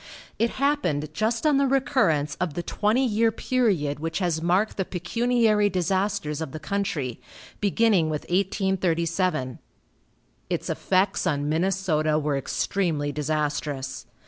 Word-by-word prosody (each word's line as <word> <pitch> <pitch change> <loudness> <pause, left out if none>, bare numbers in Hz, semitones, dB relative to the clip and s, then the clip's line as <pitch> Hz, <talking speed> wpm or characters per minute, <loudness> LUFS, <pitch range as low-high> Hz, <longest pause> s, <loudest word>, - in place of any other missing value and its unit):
It 230 - +3
happened 175 - 0
just 230 - -1
on 300 -2 +4
the 275 0 +3
recurrence 255 - +2
of 170 -5 -1
the 175 - -3
twenty 220 +9 +1
year 225 -1 +2
period 200 - 0
which 165 +1 -3
has 175 -4 0
marked 185 +6 +1
the 190 - +1
pecuniary 215 +3 +1
disasters 185 -3 -1
of 160 -4 -5
the 155 - -5
country, 155 - -3 0.4
beginning 205 -5 +3
with 150 -1 -2
1837. 180 - 0 0.9
Its - - -2
effects 190 0 +1
on 145 -4 0
Minnesota 160 -2 +1
were 150 -1 0
extremely 150 +1 -1
disastrous. 145 -3 -2
180 Hz, 125 wpm, -25 LUFS, 150-210 Hz, 0.9 s, on